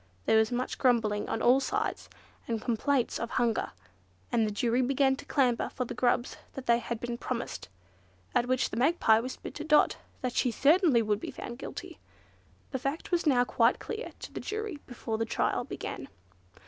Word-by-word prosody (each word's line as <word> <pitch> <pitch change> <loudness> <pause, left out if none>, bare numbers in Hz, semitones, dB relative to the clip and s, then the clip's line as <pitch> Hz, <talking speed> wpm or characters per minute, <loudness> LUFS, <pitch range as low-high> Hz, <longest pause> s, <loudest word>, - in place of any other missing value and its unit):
There 220 - +5
was 220 +1 +2
much 245 +1 -2
grumbling 225 -5 +2
on - - -2
all 250 +3 +6
sides, 270 - -2 0.4
and 230 -1 -1
complaints 250 +3 0
of 230 - -3
hunger, 235 -2 0 0.6
and 225 -2 +2
the - - -2
jury 235 +4 +1
began 265 +1 +3
to - - -10
clamour 250 -4 +1
for 250 - -3
the 245 - -5
grubs 245 0 +1 0.2
that 270 - -7
they 235 -1 +4
had 235 -1 -4
been 240 0 -4
promised, 245 - -4 0.6
at 240 - +2
which 255 0 +1
the - - -4
Magpie 245 -5 +4
whispered 255 +3 -6
to 305 - -6
Dot 300 -1 +4 0.2
that 250 -2 -2
she 250 - +2
certainly 285 - +4
would 210 -1 0
be - - -6
found 240 +1 -7
guilty. - - -8 0.7
The 265 - -2
fact 275 +7 -3
was 345 -2 +1
now 250 -4 +5
quite 235 0 +3
clear 450 +2 -6
to - - -8
the - - -4
jury 425 -7 -4
before 230 -3 -4
the 225 - +1
trial - - 0
began. - - -6
245 Hz, 185 wpm, -29 LUFS, 230-275 Hz, 0.7 s, all